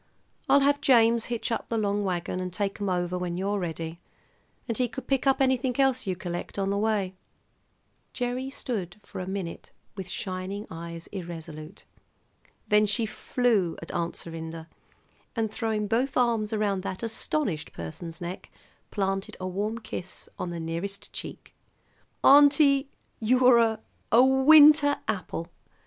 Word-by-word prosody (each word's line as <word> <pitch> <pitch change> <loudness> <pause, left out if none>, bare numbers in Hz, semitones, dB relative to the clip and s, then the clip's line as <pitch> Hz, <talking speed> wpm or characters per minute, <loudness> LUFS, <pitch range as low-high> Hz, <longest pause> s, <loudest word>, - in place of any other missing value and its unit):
I'll 280 - +6
have 285 +1 +3
James 230 -3 +4
hitch 235 -1 -3
up 230 - -2
the 230 - 0
long 205 -1 0
wagon 180 -1 -2
and 185 0 -4
take 200 +2 -3
'em 200 - 0
over 180 0 -1
when 175 -1 -3
you're 200 +2 -1
ready, 165 -1 -5 0.7
and 230 - -1
he 250 +1 +1
could 240 +2 -8
pick 270 0 0
up 270 - +4
anything 260 -1 +1
else 260 -4 +2
you 185 - 0
collect, 175 +1 -6
on 195 0 0
the 200 - 0
way." 205 -3 0 1.0
Gerry 250 +1 -3
stood 210 -9 -4
for - - -8
a 180 - -5
minute 190 -3 -5 0.2
with 190 -3 -6
shining 190 +2 -4
eyes, 170 0 -7
irresolute. 165 -4 -8 0.8
Then 210 0 +4
she 210 +3 +1
flew 215 -6 0
at 165 - -8
Aunt 170 -1 -2
Serinda, 165 -1 -7 0.7
and, 225 -2 -1
throwing 220 -2 -1
both 245 +6 0
arms 230 -3 +2
around 205 -3 0
that 185 +2 -5
astonished 225 - -1
person's 165 - -7
neck, 175 +1 -6 0.4
planted 195 -1 -2
a 185 - -4
warm 205 +5 -2
kiss 190 -5 -7
on 180 - -3
the 170 -1 -5
nearest 170 +5 -5
cheek. - - -8 0.7
"Auntie, 280 -1 +6 0.3
you're 250 +1 +5
a 225 -1 +2 0.3
a 240 +3 +7
winter 290 +2 +7
apple! 175 -4 -3
205 Hz, 150 wpm, -27 LUFS, 180-245 Hz, 1.0 s, a